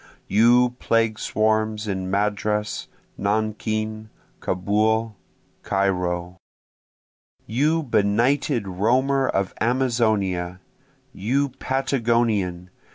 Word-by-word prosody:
You 120 +4 +4
plague 115 -1 +1
swarms 110 0 0
in 95 -2 -3
Madras, 105 +1 -1 0.3
Nankin, 110 +1 -2 0.3
Kaubul, 110 +4 0 0.5
Cairo! 90 -2 -1 1.1
You 150 +9 +1
benighted 120 +1 +1
roamer 130 +8 +1
of 95 -1 -1
Amazonia! 110 -8 0 0.5
you 135 +8 0
Patagonian! 115 -9 0
110 Hz, 70 wpm, -23 LUFS, 100-120 Hz, 1.1 s, You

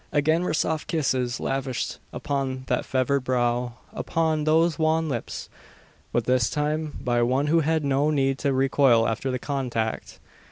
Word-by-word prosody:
Again 155 +3 +2
were 180 -3 -1
soft 155 0 -1
kisses 130 -6 0
lavished 135 -2 -2
upon 135 -2 -3
that 125 -1 -1
fevered 130 +1 0
brow 120 -1 0 0.2
upon 160 -2 0
those 160 +1 +3
wan 160 0 +2
lips; 125 -6 -4 0.6
but - - +1
this 125 -3 +2
time 150 +1 -2
by 120 -1 +1
one 130 +4 +2
who 160 +3 +3
had 160 -1 +1
no 140 +2 +2
need 135 -2 +1
to 140 - +1
recoil 130 -3 +3
after 115 +4 -2
the 130 - -1
contact. 125 -5 -3
135 Hz, 155 wpm, -25 LUFS, 125-155 Hz, 0.6 s, those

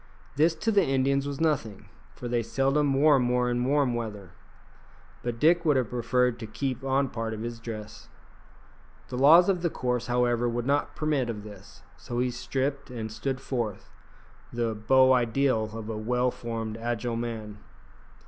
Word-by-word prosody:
This 160 +3 +3
to 225 +5 -1
the 200 -2 +4
Indians 135 0 +1
was 140 -1 -5
nothing, 135 -11 -1 0.3
for 125 - -6
they 120 0 0
seldom 135 +5 +1
wore 145 0 +5
more 125 0 +1
in 120 0 0
warm 135 -1 +2
weather; 105 -6 -5 0.9
but 120 -1 -4
Dick 165 +4 +4
would 150 -5 +3
have 125 -4 -1
preferred 125 0 +1
to 110 - -6
keep 130 +3 -3
on 135 +1 +1
part 115 -1 -4
of 110 - -6
his 120 0 -5
dress. 110 -2 -8 1.0
The 125 - -4
laws 160 +6 +7
of 185 -3 +1
the 170 - +1
course, 125 -4 -2
however, 120 -1 +1
would 120 0 -2
not 140 +2 0
permit 150 -5 0
of 105 -3 -5
this, 100 -2 -13
so 120 - -6
he 125 0 +1
stripped 135 +3 -3
and 110 -3 -5
stood 130 +4 -3
forth, 120 -7 -4 0.6
the 120 -1 -1
beau 130 +5 +4
ideal 120 -2 +1
of 110 -1 -7
a 110 -1 -4
well 125 +3 0
formed, 115 -2 -5
agile 120 0 -2
man. 110 -3 -5
125 Hz, 170 wpm, -27 LUFS, 115-135 Hz, 1.0 s, laws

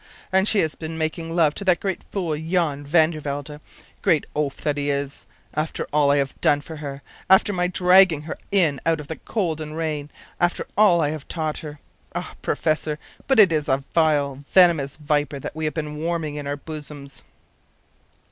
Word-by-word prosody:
And 190 +1 +3
she 215 - +4
has 160 -2 -1
been 160 0 -6
making 165 +1 -3
love 160 -4 +4
to 200 - -5
that 180 -3 +3
great 190 -2 -3
fool, 175 -6 -1
Jan 160 -2 -1
van 155 +2 +4
der 155 - -6
Welde, 145 +1 -5 0.4
great 155 - +2
oaf 145 -2 -1
that 150 -1 0
he 145 0 -2
is, 140 0 -3 0.3
after 155 +1 -2
all 145 -1 +4
I 140 - +4
have 135 -1 -2
done 145 - +4
for 160 +2 -9
her; 140 -2 -7 0.3
after 190 +2 +5
my 180 -1 +1
dragging 180 -3 +5
her 155 - -5 0.2
in 165 -8 +3
out 165 -1 +1
of 150 - -8
the 160 - -4
cold 170 -8 -2
and 155 0 -6
rain; 150 -3 -3 0.3
after 175 0 +1
all 195 -5 +5
I 145 - +1
have 155 -2 -7
taught 155 -3 -3
her. 150 -2 -9 0.4
Ah, - - -4
professor, 155 -1 -1 0.3
but 270 -4 +4
it 195 -5 +8
is 150 -2 0
a 135 - +4
vile, 145 -1 0
venomous 170 -7 +4
viper 145 -2 0
that 135 - -7
we 160 0 -3
have 155 - -2
been 150 -2 -4
warming 165 -1 -2
in 145 -1 -5
our 145 0 -2
bosoms! 145 -2 -9
155 Hz, 195 wpm, -23 LUFS, 145-170 Hz, 0.4 s, it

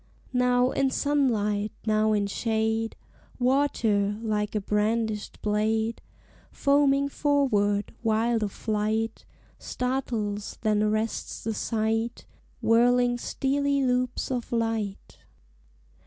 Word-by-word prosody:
Now 250 0 +3
in 275 -1 +1
sunlight, 220 -8 +1
now 215 0 +2
in 205 -1 +2
shade, 220 +2 -1 0.4
Water, 235 -6 +1
like 210 -1 -1
a - - +2
brandished 210 +1 -1
blade, 220 +2 0 0.5
Foaming 280 0 +3
forward, 240 -9 +1
wild 225 0 +1
of 205 -2 -1
flight, 220 +1 -2 0.3
Startles 235 -5 -3
then 215 -2 +2
arrests 215 +1 -1
the 225 - -1
sight, 225 +1 -1 0.4
Whirling 245 +1 +4
steely 280 +1 0
loops 250 +1 0
of 245 -2 -3
light. 225 -4 -2
225 Hz, 95 wpm, -26 LUFS, 210-250 Hz, 0.5 s, Whirling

